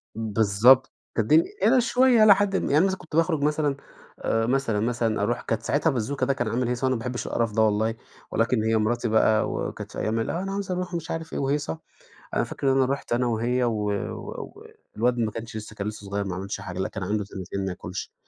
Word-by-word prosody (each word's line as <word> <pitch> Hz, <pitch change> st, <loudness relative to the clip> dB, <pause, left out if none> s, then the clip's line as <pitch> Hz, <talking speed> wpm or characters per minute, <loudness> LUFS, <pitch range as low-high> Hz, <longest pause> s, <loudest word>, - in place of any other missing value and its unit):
بالضبط 110 Hz, +4 st, +4 dB, 0.3 s
ده 115 Hz, -, +3 dB
دي 155 Hz, +9 st, +5 dB, 0.2 s
أنا 250 Hz, +4 st, +5 dB
شوية 245 Hz, -1 st, +4 dB
إلى 200 Hz, -2 st, +8 dB
حد 200 Hz, -1 st, 0 dB
ما -, -, +1 dB
يعني 145 Hz, -, +2 dB
أنا 180 Hz, -, +5 dB
مثلًا 190 Hz, -1 st, 0 dB
كنت 155 Hz, -2 st, -10 dB
باخرج 165 Hz, -3 st, +2 dB
مثلًا، 150 Hz, -2 st, +1 dB, 0.4 s
آآ، 115 Hz, 0 st, 0 dB
مثلًا، 120 Hz, -4 st, +1 dB
مثلًا 115 Hz, -2 st, 0 dB
أروح 120 Hz, +3 st, 0 dB
كانت 115 Hz, -, -2 dB
ساعتها 150 Hz, +3 st, +1 dB
بازوكا 130 Hz, +1 st, -1 dB
ده 135 Hz, -, +2 dB
كان 120 Hz, -3 st, -2 dB
عامل 120 Hz, +2 st, 0 dB
هيصة، 125 Hz, +2 st, -1 dB
وأنا 130 Hz, 0 st, +2 dB
ما -, -, -3 dB
بحبش 125 Hz, +1 st, -4 dB
القرف 115 Hz, -2 st, 0 dB
ده 110 Hz, +1 st, +1 dB
والله. 110 Hz, +1 st, +2 dB, 0.4 s
ولكن 115 Hz, 0 st, +1 dB
هي 110 Hz, 0 st, +2 dB
مراتي 120 Hz, +2 st, 0 dB
بقى 110 Hz, 0 st, +3 dB
وكانت -, -, -5 dB
في -, -, -6 dB
أيام 110 Hz, +1 st, 0 dB
ال 115 Hz, -, -2 dB
أنا 190 Hz, +3 st, -3 dB
عايزة 195 Hz, -2 st, -2 dB
أروح 180 Hz, 0 st, -4 dB
مش 170 Hz, 0 st, -4 dB
عارف 165 Hz, 0 st, -5 dB
إيه -, -, -2 dB
وهيصة، 140 Hz, -, -1 dB, 0.6 s
أنا -, -, +2 dB
فاكر 135 Hz, -1 st, -1 dB
إن -, -, +1 dB
أنا 135 Hz, -, +4 dB
رحت 140 Hz, -, -5 dB
أنا 120 Hz, +1 st, +2 dB
وهي 120 Hz, +2 st, 0 dB
و 110 Hz, -3 st, 0 dB
و 100 Hz, -, -5 dB, 0.3 s
والواد 120 Hz, +2 st, +1 dB
ما 110 Hz, -2 st, +1 dB
كانش 115 Hz, 0 st, -7 dB
لسة 110 Hz, 0 st, -8 dB
كان 100 Hz, -, -4 dB
لسة 105 Hz, -1 st, -6 dB
صغير 100 Hz, +1 st, -2 dB
ما 95 Hz, -2 st, -3 dB
عملش 100 Hz, +1 st, -5 dB
حاجة، 95 Hz, -2 st, -7 dB
لأ 95 Hz, -, -1 dB
كان 100 Hz, -, -6 dB
عنده 105 Hz, +2 st, -1 dB
سنتين 95 Hz, 0 st, -5 dB
ما 95 Hz, -, -2 dB
ياكلش. 90 Hz, +1 st, -6 dB
120 Hz, 235 wpm, -25 LUFS, 110-145 Hz, 0.6 s, إلى